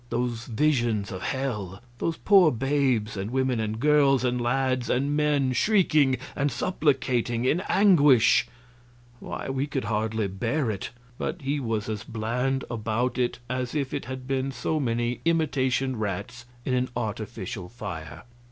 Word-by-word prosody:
Those 120 Hz, -1 st, -2 dB
visions 115 Hz, -5 st, +1 dB
of 95 Hz, -2 st, -6 dB
hell, 105 Hz, -8 st, -3 dB, 0.2 s
those 165 Hz, -1 st, -1 dB
poor 190 Hz, -6 st, +5 dB
babes 130 Hz, -4 st, 0 dB
and 100 Hz, +1 st, -3 dB
women 130 Hz, -1 st, 0 dB
and 110 Hz, 0 st, -2 dB
girls 140 Hz, -2 st, +4 dB
and 125 Hz, -1 st, 0 dB
lads 130 Hz, 0 st, 0 dB
and 140 Hz, +3 st, +1 dB
men 145 Hz, -3 st, +2 dB
shrieking 155 Hz, -, +3 dB, 0.2 s
and 145 Hz, 0 st, 0 dB
supplicating 125 Hz, -5 st, 0 dB
in 160 Hz, +7 st, +2 dB
anguish 150 Hz, -, +5 dB, 0.7 s
why, -, -, -6 dB
we 135 Hz, +1 st, -1 dB
could 140 Hz, -3 st, -2 dB
hardly 110 Hz, 0 st, -1 dB
bear 115 Hz, +7 st, -1 dB
it, 100 Hz, -, -5 dB, 0.3 s
but 160 Hz, -1 st, -3 dB
he 140 Hz, +2 st, 0 dB
was 115 Hz, -5 st, -2 dB
as 110 Hz, -1 st, -3 dB
bland 125 Hz, +4 st, -2 dB
about 115 Hz, +3 st, -1 dB
it 125 Hz, -1 st, 0 dB
as 125 Hz, +2 st, -3 dB
if 140 Hz, -3 st, -1 dB
it 145 Hz, -, -3 dB
had 130 Hz, 0 st, -6 dB
been 135 Hz, 0 st, -1 dB
so 135 Hz, +5 st, -1 dB
many 120 Hz, -2 st, -1 dB
imitation 135 Hz, -5 st, +1 dB
rats 110 Hz, +3 st, -4 dB, 0.2 s
in 130 Hz, -, 0 dB
an 125 Hz, 0 st, +1 dB
artificial 110 Hz, -4 st, -4 dB
fire. 80 Hz, -9 st, -7 dB
125 Hz, 150 wpm, -26 LUFS, 115-140 Hz, 0.7 s, poor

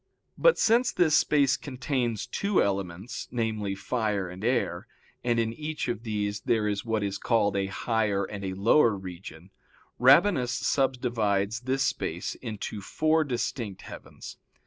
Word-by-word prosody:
But -, -, +4 dB
since 235 Hz, +3 st, +3 dB
this 160 Hz, -4 st, +3 dB
space 140 Hz, -3 st, +3 dB
contains 130 Hz, -5 st, -2 dB
two 200 Hz, -1 st, 0 dB
elements, 95 Hz, +1 st, -3 dB
namely, 110 Hz, -4 st, -2 dB
fire 105 Hz, -2 st, -1 dB
and 90 Hz, +3 st, -9 dB
air, 120 Hz, -7 st, 0 dB, 0.4 s
and 120 Hz, -1 st, +1 dB
in 115 Hz, 0 st, 0 dB
each 155 Hz, +3 st, -4 dB
of 115 Hz, -2 st, -2 dB
these 105 Hz, -3 st, -2 dB
there 110 Hz, +1 st, +1 dB
is 100 Hz, -1 st, -1 dB
what 110 Hz, -2 st, -1 dB
is 100 Hz, -1 st, -3 dB
called 105 Hz, -4 st, +1 dB
a 100 Hz, 0 st, 0 dB
higher 105 Hz, +1 st, 0 dB
and 100 Hz, +1 st, -6 dB
a 95 Hz, -1 st, -3 dB
lower 115 Hz, +3 st, +4 dB
region 90 Hz, -1 st, -10 dB, 0.5 s
Rabanus 130 Hz, -, +5 dB
subdivides 115 Hz, -6 st, 0 dB
this 130 Hz, +2 st, -1 dB
space 85 Hz, -8 st, -2 dB
into 110 Hz, -3 st, -6 dB
four 155 Hz, +9 st, +1 dB
distinct 120 Hz, -6 st, -4 dB
heavens. -, -, -10 dB
110 Hz, 145 wpm, -27 LUFS, 100-130 Hz, 0.5 s, Rabanus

